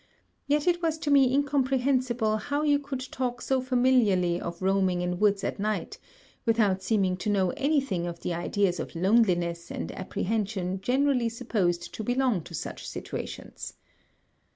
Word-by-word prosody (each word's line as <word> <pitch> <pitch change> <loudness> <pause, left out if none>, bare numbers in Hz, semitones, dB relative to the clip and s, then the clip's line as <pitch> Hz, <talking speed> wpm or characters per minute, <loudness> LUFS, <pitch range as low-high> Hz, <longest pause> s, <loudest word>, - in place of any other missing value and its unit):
Yet 290 +1 +2
it 350 0 +2
was 325 -2 0
to 300 -2 -2
me 270 -3 +5
incomprehensible 260 -5 +1
how 285 +6 -2
you 290 -1 +3
could 275 -2 -5
talk 250 -1 -2
so 265 -1 0
familiarly 245 -9 +2
of 170 0 -5
roaming 190 -2 +1
in 180 0 -2
woods 205 -2 +2
at - - -3
night, 215 +1 -2 0.4
without 215 -5 +2
seeming 190 -2 +1
to 185 - -3
know 190 -3 +2
any 290 +2 +1
thing 185 -11 -2
of 170 -1 -6
the 175 - -2
ideas 180 +2 0
of - - -6
loneliness 175 -3 +2
and - - -5
apprehension 190 -1 -2
generally 255 0 +2
supposed 180 -7 -1
to 220 - -5
belong 245 -4 +1
to 170 - -8
such - - -6
situations. - - -7
215 Hz, 155 wpm, -27 LUFS, 185-260 Hz, 0.4 s, me